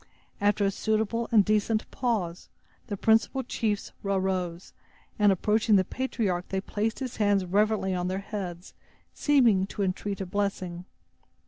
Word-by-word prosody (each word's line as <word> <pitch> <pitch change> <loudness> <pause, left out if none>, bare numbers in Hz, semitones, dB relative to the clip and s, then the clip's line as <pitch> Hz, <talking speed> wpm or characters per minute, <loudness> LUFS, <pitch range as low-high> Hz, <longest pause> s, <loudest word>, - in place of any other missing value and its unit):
After 205 0 +2
a 195 - +2
suitable 220 +3 -1
and 210 -4 +5
decent 215 +1 +1
pause, 205 -9 -2 0.4
the 205 - -4
principal 225 +6 +2
chiefs 215 -4 -2
arose, 185 -3 -2 0.5
and, 205 -1 +6
approaching 210 +3 +2
the 190 - +5
patriarch, 200 -6 -2
they 190 - -1
placed 215 +3 -2
his 255 -3 -5
hands 205 -3 +2
reverently 205 +1 +1
on 180 0 -1
their 185 +1 -1
heads, 195 -3 -6 0.4
seeming 235 -10 +3
to 200 - -3
entreat 195 +1 -2
a 195 - -3
blessing. 185 -2 -3
205 Hz, 140 wpm, -27 LUFS, 190-220 Hz, 0.5 s, and